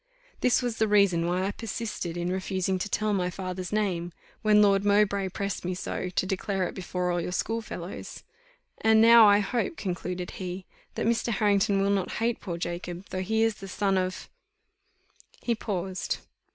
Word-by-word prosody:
This 250 0 +3
was 240 -2 -2
the 220 - +2
reason 200 -5 +3
why 180 +2 0
I 200 - 0
persisted 210 -6 -4
in 175 +1 -1
refusing 190 0 -1
to 205 - -3
tell 215 0 0
my 180 -2 0
father's 185 0 -5
name, 180 -5 -1 0.3
when 210 -1 +5
Lord 200 -1 +4
Mowbray 200 -1 +2
pressed 200 +1 -3
me 180 +1 -2
so 185 0 -4
to 185 - 0
declare 190 -1 -1
it - - -7
before 180 -1 -2
all 175 0 0
your 180 - -4
school 225 +5 -1
fellows. 180 -4 -7 0.6
And 220 0 +5
now, 230 0 +8
I 205 0 +6
hope," 235 +8 -2
concluded 180 -1 -4
he, 185 0 -6 0.3
"that - - -1
Mr. 230 +1 +1
Harrington 200 -1 +2
will 200 - +2
not 195 -2 0
hate 230 +1 0
poor 175 -4 -4
Jacob, 175 +1 -5
though 185 - -2
he 220 +4 +1
is 225 -2 +1
the 195 - -9
son 195 +1 0
of 185 0 -2 0.6
" - - -31
He 235 - +1
paused. 190 -4 -3
195 Hz, 185 wpm, -27 LUFS, 180-210 Hz, 0.6 s, now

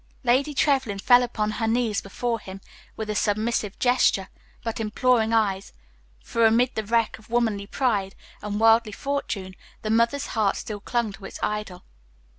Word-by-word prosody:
Lady 270 +4 +2
Trevlyn 265 -8 +1
fell 245 +5 +5
upon 215 -3 -1
her 225 +1 -2
knees 225 -3 +1
before 230 +3 -3
him, 190 -2 -9 0.4
with 220 - -5
a 210 - -2
submissive 210 0 -1
gesture, 245 -6 +2 0.3
but 230 -1 -3
imploring 225 +1 +2
eyes, 200 -4 0 0.5
for, 230 - 0
amid 235 +3 +4
the 220 - -2
wreck 230 +1 0
of 215 - -20
womanly 225 -4 0
pride 205 -7 -1 0.3
and 210 0 -3
worldly 225 -1 +4
fortune, 225 -8 -3 0.3
the 215 - -1
mother's 235 +5 +2
heart 215 -3 +1
still 210 -2 -6
clung 235 +1 -1
to 195 0 -11
its - - -8
idol. 210 -4 -3
225 Hz, 160 wpm, -25 LUFS, 210-240 Hz, 0.5 s, fell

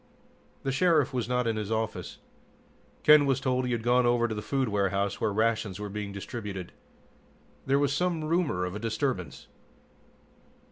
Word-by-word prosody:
The 135 - 0
Sheriff 150 -1 +3
was 120 -2 -2
not 125 -1 +1
in 115 -1 0
his 105 0 -4
office. 110 0 -3 0.9
Ken 150 -2 +7
was 135 -1 +2
told 130 -2 0
he - - -2
had 115 -2 -1
gone 125 +1 +4
over 120 -1 +3
to 110 - -3
the 105 - -4
food 135 +3 -1
warehouse 100 -1 0
where 110 - +1
rations 110 -2 0
were 105 0 -5
being 105 0 -5
distributed. 100 -2 -6 1.0
There 135 +1 +3
was 140 0 +1
some 170 0 0
rumor 155 - 0
of 90 - -5
a 105 - -5
disturbance. 115 - -3
115 Hz, 170 wpm, -28 LUFS, 105-135 Hz, 1.0 s, Ken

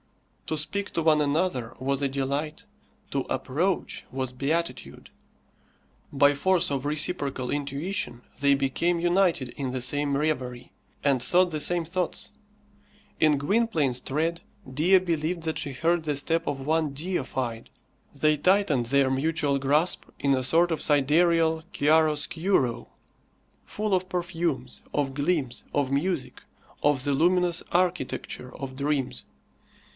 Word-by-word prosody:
To 155 - -2
speak 200 +7 -2
to 165 - -1
one 155 -1 +4
another 145 -6 -1
was 135 +1 -1
a 140 - +1
delight, 140 +3 -3 0.5
to - - 0
approach 175 +8 -1
was 130 -1 -3
beatitude; 155 +6 -3 1.0
by 145 +1 +4
force 180 +3 +1
of 135 -1 -2
reciprocal 145 -4 -1
intuition 145 -1 -3 0.2
they 140 0 +5
became 155 +6 0
united 175 -6 +2
in 130 +1 -4
the 130 - -2
same 140 +3 +1
reverie, 130 -5 -2 0.3
and 135 -3 +3
thought 180 +4 +3
the 155 -1 -3
same 175 +1 +2
thoughts. 180 +1 -3 0.9
In 150 -2 +4
Gwynplaine's 150 - +1
tread 165 +6 -1 0.3
Dea 160 +9 +4
believed 170 -1 -1
that 160 -1 -2
she 140 - -3
heard 165 +5 0
the 150 -2 -1
step 165 +3 +1
of 135 -2 -3
one 155 -1 +1
deified. 135 -7 -3 0.4
They 155 +2 +2
tightened 150 - +2
their 135 +1 +3
mutual 145 +1 +1
grasp 145 +6 +1
in 140 -1 +2
a 130 -1 0
sort 170 +6 +3
of 160 - -1
sidereal 160 +3 +3
chiaroscuro, 155 -2 +1 0.8
full 210 -1 -2
of 185 0 0
perfumes, 170 -7 -3
of 140 -2 0
gleams, 145 -3 -1
of 140 -2 0
music, 140 -3 -2 0.4
of 145 -3 +2
the 145 - +1
luminous 175 +3 +2
architecture 175 -7 -1
of 135 -1 -6
dreams. 135 -2 -2
150 Hz, 130 wpm, -26 LUFS, 135-170 Hz, 1.0 s, they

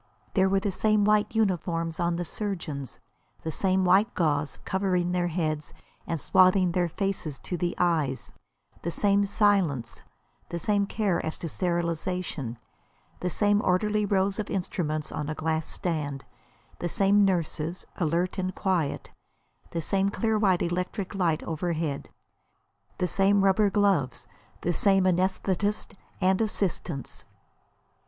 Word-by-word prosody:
There 190 -1 +3
were 195 0 +3
the 200 +1 -1
same 215 +2 +2
white 210 +1 +2
uniforms 170 -6 0
on 170 0 +1
the 175 +1 -3
surgeons; 160 - -4 0.5
the 160 - -2
same 190 +2 +1
white 195 +6 +4
gauze 150 -3 0
covering 185 -2 0
their 180 -1 +1
heads 155 -3 -2 0.3
and 165 - -2
swathing 185 +3 +4
their 175 0 +1
faces 185 -6 -2
to 180 - -5
the 175 0 -1
eyes; 155 -7 0 0.5
the 170 - -2
same 200 +3 +3
silence, 190 - +1 0.5
the 170 - -3
same 200 +3 +1
care 205 -5 0
as 160 - -3
to 170 - -5
sterilisation; 170 -6 -2 0.6
the 180 - -1
same 205 +3 +3
orderly 210 +3 +2
rows 195 0 +1
of 215 - -3
instruments 155 -5 -2
on 150 0 -3
a 155 - -3
glass 160 0 -1
stand; 150 -6 -2 0.5
the 175 - -2
same 200 +3 +4
nurses, 170 -2 0
alert 175 +3 0
and 185 0 -2
quiet; 180 -7 -1 0.6
the 165 - -3
same 195 +4 +1
clear 220 +1 0
white 190 -4 +3
electric 180 +3 -2
light 175 -5 0
overhead; 160 -3 -2 0.9
the - - 0
same 195 +2 +3
rubber 195 +2 +4
gloves, 190 - +1 0.4
the 175 - 0
same 195 +2 +3
anæsthetists 185 +2 0 0.3
and 190 +2 +2
assistants. 175 - -2
180 Hz, 135 wpm, -27 LUFS, 165-195 Hz, 0.9 s, white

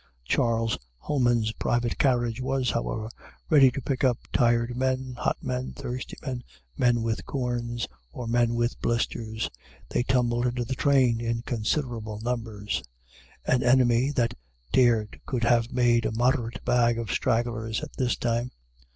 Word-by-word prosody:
Charles 115 - +1 0.2
Homans's 120 - +1
private 120 +1 -1
carriage 120 -3 +2
was, 130 0 0
however, 110 -1 -2 0.4
ready 140 -4 +8
to 130 +1 -5
pick 135 0 -2
up 125 -3 +4 0.2
tired 120 0 +2
men, 130 0 -1
hot - - 0
men, 125 0 -3
thirsty 125 +1 -6
men, 125 -3 -3 0.3
men 120 - +2
with 115 -1 -1
corns, 120 -3 -2 0.2
or 120 - -6
men 120 0 +2
with 120 0 -1
blisters. 115 -1 -1 0.4
They - - +1
tumbled 120 -1 +1
into 120 0 -1
the 130 - -3
train 130 -4 +3
in 115 0 -1
considerable 115 -3 -2
numbers. 115 -4 -2 0.6
An 125 - +2
enemy 125 0 +4
that 120 -4 +1 0.4
dared 115 -4 +3
could 125 -3 -1
have 120 0 +3
made 120 -2 +3
a - - -2
moderate 120 +1 0
bag 120 -1 +3
of 115 -2 -3
stragglers 115 -1 0
at - - -7
this 125 -2 0
time. 120 +1 -1
120 Hz, 145 wpm, -27 LUFS, 115-125 Hz, 0.6 s, ready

